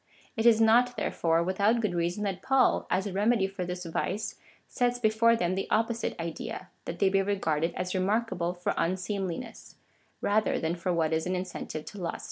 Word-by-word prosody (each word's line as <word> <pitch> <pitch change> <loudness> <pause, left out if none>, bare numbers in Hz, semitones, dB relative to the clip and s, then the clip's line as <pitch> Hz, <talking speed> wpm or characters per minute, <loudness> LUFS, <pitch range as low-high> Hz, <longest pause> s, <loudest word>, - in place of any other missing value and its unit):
It 225 0 +2
is 225 -2 +6
not, 240 +2 +4
therefore, 165 -5 +1
without 200 +6 +2
good 210 -5 0
reason 175 +4 -1
that 195 -2 -2
Paul, 265 -1 +3
as 185 +2 +1
a 200 - -4
remedy 210 +1 +2
for 195 -1 -4
this 180 0 -5
vice, 190 +5 -3 0.3
sets 245 -1 0
before 230 0 +3
them 180 -4 0
the 195 - -3
opposite 230 -1 0
idea 170 +2 -5
— - - -42
that 170 - -5
they 200 - +3
be 195 0 +3
regarded 170 -5 0
as 180 0 -3
remarkable 185 -2 0
for 175 - -1
unseemliness, 190 +5 -3 0.4
rather 215 +1 +1
than 160 +1 -1
for 175 +1 -2
what 165 -2 +1
is 160 +2 0
an 185 - 0
incentive 180 -4 -5
to 205 - -9
lust. 170 -2 -3
190 Hz, 190 wpm, -29 LUFS, 175-220 Hz, 0.4 s, is